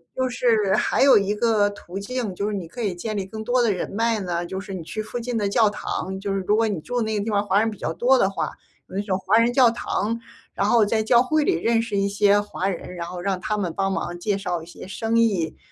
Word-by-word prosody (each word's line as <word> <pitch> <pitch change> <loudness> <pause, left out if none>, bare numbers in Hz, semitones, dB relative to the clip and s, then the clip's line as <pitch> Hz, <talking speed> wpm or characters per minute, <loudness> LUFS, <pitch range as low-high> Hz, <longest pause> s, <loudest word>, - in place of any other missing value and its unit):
就 260 0 0
是 225 -5 +2
还 - - +1
有 275 - +7
一 200 +1 +1
个 210 -2 +2
途 195 -2 -8
径， 225 0 -3
就 200 +3 -2
是 - - -3
你 185 -4 -5
可 240 +9 -8
以 200 -5 -1
建 215 +4 -4
立 195 - -2
更 220 +3 -7
多 245 +2 +2
的 230 - +3
人 185 - -3
脉 225 +1 +1
呢， 175 -2 -2
就 190 +2 -5
是 195 - -8
你 185 - -5
去 215 +6 -5
附 220 +3 -5
近 240 0 -3
的 205 -2 0
教 220 +1 +4
堂， 190 -2 -4
就 195 0 -3
是 195 - 0
如 210 - +4
果 225 +1 +2
你 200 -6 -2
住 245 +9 -4
的 240 - +2
那 220 -1 -1
个 200 - -1
地 - - -2
方 205 0 +1
华 200 0 +3
人 225 +1 +2
比 210 - -9
较 - - -3
多 255 +8 +3
的 195 - +3
话， 195 - -3 0.4
有 - - -11
那 200 - 0
种 195 -3 -1
华 195 +4 +3
人 230 +1 +3
教 250 -2 +6
堂， 230 -1 -2 0.3
然 200 - 0
后 230 -1 +5
在 220 +1 +1
教 235 +2 +5
会 310 +4 +1
里 - - +2
认 225 +7 +2
识 225 -3 -3
一 200 0 +2
些 200 0 +4
华 195 -2 -3
人， 180 -1 -6
然 170 -1 -5
后 180 +1 -6
让 190 0 -1
他 210 +4 -1
们 180 -5 -2
帮 195 0 0
忙 175 -2 -3
介 200 +2 0
绍 180 -4 -3
一 - - -10
些 175 - -10
生 225 +3 0
意， 195 -8 +1
205 Hz, 305 characters per minute, -23 LUFS, 190-230 Hz, 0.4 s, 有